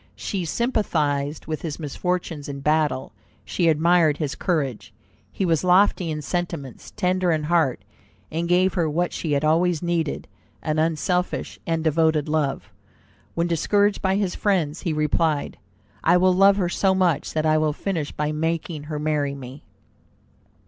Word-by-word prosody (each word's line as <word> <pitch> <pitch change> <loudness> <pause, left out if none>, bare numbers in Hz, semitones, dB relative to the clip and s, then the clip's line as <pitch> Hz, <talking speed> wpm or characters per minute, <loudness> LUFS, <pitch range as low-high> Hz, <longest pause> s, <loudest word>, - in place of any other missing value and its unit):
She 190 -4 -3
sympathized 155 - -1
with 155 -1 -4
his 155 -3 -4
misfortunes 165 0 -3
in 140 -1 -6
battle; 150 -3 +1 0.3
she 175 - 0
admired 160 -1 +3
his 150 -3 -2
courage. 145 - -2 0.4
He 195 - -2
was 165 -2 +1
lofty 180 -1 +3
in 150 -1 -4
sentiments, 170 -6 -4
tender 180 -1 0
in 155 -1 0
heart, 155 - +1 0.5
and 170 +1 -2
gave 185 +2 +3
her 165 -4 0
what 175 +4 -1
she 155 -3 -2
had 145 +2 +1
always 170 +1 +2
needed, 170 -3 -1 0.4
an 155 -1 0
unselfish 165 +3 -1
and 165 -1 0
devoted 160 -1 +2
love. 150 -3 -1 0.6
When 170 - +1
discouraged 200 +5 +1
by 190 0 +1
his 195 -3 0
friends, 175 -7 0
he 170 - -1
replied, 155 0 0 0.4
"I 180 - +5
will 185 +1 +4
love 195 +2 +5
her 185 -3 +1
so 190 +2 +1
much 175 -6 +1
that 155 0 0
I 155 0 +3
will 155 -1 +1
finish 160 -1 -3
by 150 0 -2
making 160 0 -2
her 150 0 -4
marry 150 -2 -1
me." 135 +1 -10
160 Hz, 155 wpm, -23 LUFS, 150-180 Hz, 0.6 s, I